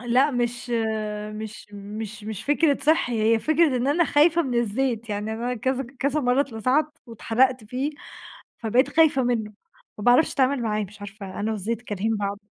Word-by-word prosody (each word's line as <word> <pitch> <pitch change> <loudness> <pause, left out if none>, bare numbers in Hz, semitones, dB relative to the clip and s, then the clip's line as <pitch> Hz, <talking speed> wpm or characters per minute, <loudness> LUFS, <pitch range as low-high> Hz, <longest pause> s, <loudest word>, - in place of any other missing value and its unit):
لأ 250 +4 +3
مش 240 -1 -2 0.6
مش 215 0 -7
مش 210 +1 -7
مش 215 -3 -5
فكرة 290 0 +2
صحّي، 245 -8 +2
هي - - +2
فكرة 310 +1 +2
إن 250 +2 -1
أنا 330 +5 +3
خايفة 320 +3 +4
من 260 -5 -3
الزيت، 235 0 -1
يعني 210 +1 -3
أنا 240 +3 -2
كذا 260 +2 -2
كذا 280 +3 0
مرّة 250 0 +2
اتلسعت، 270 +4 0
واتحرقت 240 +1 +1
فيه 255 +7 -2 0.7
فبقيت 240 +4 +2
خايفة 315 -5 +4
منّه، 225 -4 -1 0.4
ما 210 - -7
باعرفش 245 +6 +4
أتعامل 265 -1 +2
معاه، 215 -2 -1
مش 205 +1 -12
عارفة 200 -1 -8
أنا 215 +2 -1
والزيت 220 +2 -2
كارهين 215 0 -2
بعض. 200 0 -3
240 Hz, 165 wpm, -24 LUFS, 215-270 Hz, 0.7 s, خايفة